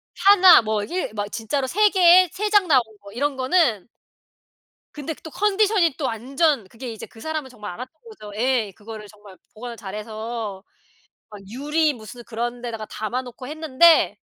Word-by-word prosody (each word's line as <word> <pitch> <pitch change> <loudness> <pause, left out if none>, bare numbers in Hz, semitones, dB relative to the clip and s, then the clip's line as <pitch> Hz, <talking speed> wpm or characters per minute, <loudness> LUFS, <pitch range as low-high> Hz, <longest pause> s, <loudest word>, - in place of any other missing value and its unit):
1 380 -2 +7
뭐 215 -1 -1
1 350 - -4
막 205 -1 -4
진짜로 260 +4 -2
3 420 +9 +3
개에 365 -1 +6
3 420 +2 -2
장 410 -3 +3
나온 275 -6 +5 0.2
거 200 0 -13
이런 280 +6 -2
거는 260 - +1 1.1
근데 295 +2 -5
또 320 - -9
컨디션이 405 -5 +2
또 290 - -3
완전 260 - 0
그게 235 +4 -8
이제 220 - -9
그 225 - -17
사람은 310 +1 -4
정말 210 -6 -9
알았던 255 - -10
거죠. 320 - -11
에 235 -2 0
그거를 215 +1 -10
정말 205 -2 -16 0.2
보관을 235 +2 -8
잘해서 215 0 -6 0.7
막 210 -1 -11
유리 295 +6 0
무슨 235 +1 -11
그런 240 +2 -4
데다가 225 -3 -6
담아 220 +5 -4
놓고 250 0 -10
했는데 315 +2 +3
250 Hz, 290 characters per minute, -22 LUFS, 220-320 Hz, 1.1 s, 1